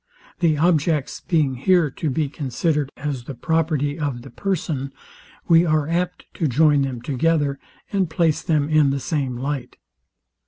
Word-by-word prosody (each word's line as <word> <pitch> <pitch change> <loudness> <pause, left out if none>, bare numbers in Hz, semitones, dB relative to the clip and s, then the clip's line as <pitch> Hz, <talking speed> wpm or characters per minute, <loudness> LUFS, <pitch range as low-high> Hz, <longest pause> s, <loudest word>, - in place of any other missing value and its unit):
The 160 -4 +2
objects 155 -3 +1
being 155 -6 +1
here 160 +3 +2
to 155 - -3
be 150 +2 0
considered 145 +1 -1
as 135 -4 -4
the 135 - -7
property 155 0 0
of 140 -5 -3
the 135 - -11
person, 155 -8 -2 0.6
we 165 -1 +6
are 155 -3 +1
apt 175 +2 -2
to 165 - +1
join 145 +2 +4
them 130 -4 -3
together, 145 0 +1 0.3
and 190 -4 +1
place 160 -2 +1
them 150 -3 +1
in 155 -2 +4
the 135 0 -1
same 135 -4 -2
light. 135 0 -4
150 Hz, 155 wpm, -22 LUFS, 140-165 Hz, 0.6 s, we